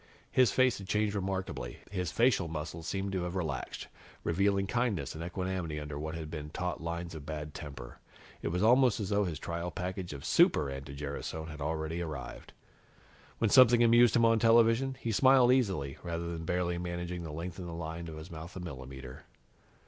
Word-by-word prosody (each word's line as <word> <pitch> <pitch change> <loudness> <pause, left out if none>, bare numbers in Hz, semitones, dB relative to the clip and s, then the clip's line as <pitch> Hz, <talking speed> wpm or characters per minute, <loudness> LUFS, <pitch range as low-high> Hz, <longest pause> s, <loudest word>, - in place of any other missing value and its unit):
His 125 -5 +5
face 130 -2 +3
had 95 - -9
changed 105 0 +1
remarkably. 95 -10 -3
His 90 -5 -2
facial 115 -6 +3
muscles 80 +1 -5
seemed 95 +2 -2
to 95 -2 -1
have 90 +1 -3
relaxed, 80 -8 -3 0.4
revealing 100 +3 +2
kindness 120 -2 -1
and 80 - -6
equanimity 90 -3 -3
under 75 -1 -6
what 80 +1 -4
had 80 -2 -6
been 75 -2 -5
taut 90 +2 -3
lines 85 0 -4
of 80 -3 -7
bad 75 0 -5
temper. 70 -7 -8 0.4
It - - -3
was 90 +4 0
almost 125 0 +5
as 100 -3 -3
though 105 0 +2
his 85 -4 -3
trial 85 +3 -4
package 90 +1 -4
of 70 -2 -7
Super 70 - +4
anti 70 +1 -7
gerasone 75 +3 -5
had 75 -1 -8
already 80 +2 -2
arrived. 75 -7 -6 0.9
When 110 -3 +1
something 120 -2 +7
amused 120 0 +6
him 120 -1 +5
on 115 0 +4
television, 115 +3 +4
he 115 - -2
smiled 130 +2 +6
easily, 95 - 0
rather 85 0 -3
than 80 -1 -5
barely 90 0 0
managing 85 0 -4
to 80 - -6
lengthen 90 +4 -5
the 85 - -6
thin - - -6
line 85 +1 -5
of 80 -1 -7
his 80 +3 -9
mouth 80 +2 -8
a - - -5
millimeter. 65 -5 -8
85 Hz, 190 wpm, -31 LUFS, 80-100 Hz, 0.9 s, something